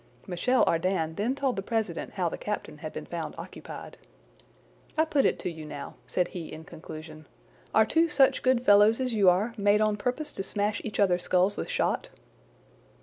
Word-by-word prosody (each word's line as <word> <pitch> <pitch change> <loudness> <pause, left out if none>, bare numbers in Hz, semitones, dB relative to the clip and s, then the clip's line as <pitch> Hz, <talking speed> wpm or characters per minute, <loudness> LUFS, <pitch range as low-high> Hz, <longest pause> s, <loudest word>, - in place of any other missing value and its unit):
Michel 225 +8 +2
Ardan 165 -1 0
then 220 +9 -1
told 270 -3 0
the 195 - -2
president 220 +1 -2
how - - 0
the - - -3
captain - - -5
had - - -6
been - - -7
found - - -5
occupied. - - -9 1.0
"I 315 - +4
put 290 -4 +2
it - - +2
to 180 - -2
you 160 -1 -9
now," 145 -2 -7
said 180 -1 0
he 170 -3 -7
in 160 - -8
conclusion, 155 -2 -10 0.4
"are 220 - +5
two 330 +8 +2
such 275 -3 +4
good 255 -1 +2
fellows 205 +3 +6
as 255 -2 -1
you 200 -4 +5
are 200 +6 +1
made 205 0 +3
on 215 -1 +2
purpose 250 +8 -3
to 195 - -4
smash 205 +1 -1
each 215 - -5
other's 180 -3 +3
skulls 185 +3 +2
with - - -4
shot?" - - 0
205 Hz, 190 wpm, -28 LUFS, 175-245 Hz, 1.0 s, fellows